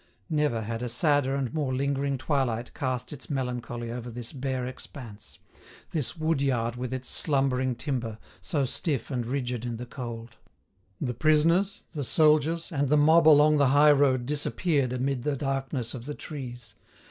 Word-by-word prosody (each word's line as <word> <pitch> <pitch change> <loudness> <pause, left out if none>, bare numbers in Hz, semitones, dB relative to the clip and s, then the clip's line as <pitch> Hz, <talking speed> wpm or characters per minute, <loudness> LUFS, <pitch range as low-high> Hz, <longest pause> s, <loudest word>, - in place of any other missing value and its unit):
Never 150 -7 +1
had 115 +2 -4
a 125 - -2
sadder 145 0 +2
and 135 -2 -2
more 145 -5 -1
lingering 140 0 0
twilight 130 -4 -1
cast 130 0 -3
its 140 - -7
melancholy 125 -3 -3
over 120 0 -5
this 120 0 -8
bare 130 -2 -2
expanse—this 125 +4 -8
wood 155 -2 0
yard 120 -4 0
with 125 0 -4
its 130 -1 -4
slumbering 130 -3 +1
timber, 115 -3 -3 0.2
so 135 +10 0
stiff 140 +1 -2
and 120 -3 -2
rigid 125 -3 -2
in 120 -2 -3
the 125 - -6
cold. 120 -2 -7 0.6
The 125 -4 -2
prisoners, 165 - +2
the 150 -4 -4
soldiers, 155 +4 +3
and 140 -3 0
the 150 - +4
mob 160 +2 +5
along 150 0 +7
the 140 -1 +4
high 150 +1 +7
road 135 -4 +3
disappeared 145 -1 0
amid 130 +1 -1
the 145 +2 -1
darkness 135 -3 -2
of 120 -2 -7
the 150 - -4
trees. 125 -7 -8
135 Hz, 160 wpm, -27 LUFS, 120-145 Hz, 0.6 s, along